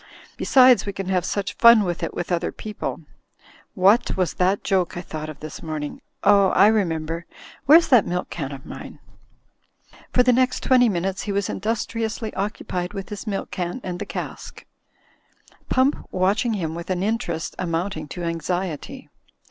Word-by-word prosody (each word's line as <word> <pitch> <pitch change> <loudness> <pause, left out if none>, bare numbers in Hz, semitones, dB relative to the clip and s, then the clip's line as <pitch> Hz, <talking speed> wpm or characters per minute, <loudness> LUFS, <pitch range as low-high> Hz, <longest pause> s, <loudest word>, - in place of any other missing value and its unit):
Besides, 255 -4 +5
we 200 - -2
can 195 -1 -5
have 185 -2 +1
such 200 +2 -2
fun 235 -2 +7
with 175 -3 -3
it - - -2
with 175 - -5
other 170 0 0
people 215 -1 -6 0.4
— - - -27
^what 200 +6 +4
was 185 -3 0
that 185 +2 +1
joke 185 -3 0
I - - -3
thought 155 -3 -6
of 150 -2 -10
this 155 0 -8
morning? 155 -2 -5 0.2
Oh, 200 -1 +6
I 205 - +7
remember! 170 -5 -1 0.4
Where's 325 +4 +7
that 245 -6 +5
milk 180 +1 -3
can 140 -5 -4
of 135 -1 -9
mine?" - - -9 1.1
For 250 - +4
the 250 0 +4
next 255 +1 +1
twenty 250 -2 +5
minutes 190 0 -2
he 205 - -4
was 200 -1 -1
industriously 225 +1 -3
occupied 185 -3 -3
with 195 -1 -6
his 210 +2 -7
milk 200 -2 -3
can 180 +5 -3
and 180 -1 -5
the - - -5
cask; - - -7 1.0
Pump 260 +3 +3
watch 190 +5 +1
ing 235 - +1
him 165 -6 -2
with 170 +2 -7
an 185 0 -1
interest 200 -7 -2
amounting 165 -2 -2
to 175 +4 -7
anxiety. 175 - -3
190 Hz, 170 wpm, -23 LUFS, 170-220 Hz, 1.1 s, fun